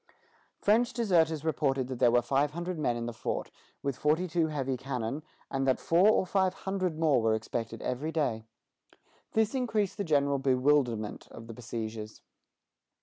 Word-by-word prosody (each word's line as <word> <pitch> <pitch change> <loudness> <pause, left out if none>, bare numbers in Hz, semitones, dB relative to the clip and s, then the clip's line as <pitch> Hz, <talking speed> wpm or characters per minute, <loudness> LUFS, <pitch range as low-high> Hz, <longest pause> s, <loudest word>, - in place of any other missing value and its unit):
French 235 +4 +2
deserters 165 - +2
reported 135 -5 0
that 130 -2 -5
there 125 - +5
were 120 0 +3
five 140 +2 +1
hundred 175 0 -4
men 120 -5 0
in 115 - -3
the 120 - -4
fort, 110 - -3 0.3
with 140 -2 -1
forty 155 +4 +2
two 165 -1 +1
heavy 135 -4 -2
cannon, 130 +1 -3 0.3
and 135 0 0
that 130 - +3
four 180 +5 +4
or 215 - +3
five 190 0 +1
hundred 185 -4 -1
more 155 -6 +3
were 110 -1 +2
expected 115 0 -4
every 140 +6 -2
day. 135 -9 -1 0.9
This 220 +1 +2
increased 220 -7 0
the 200 - -1
general 140 -4 +2
bewilderment 130 -4 +1
of 115 - -10
the 115 - -8
besiegers. 110 -2 -6
140 Hz, 165 wpm, -30 LUFS, 120-175 Hz, 0.9 s, there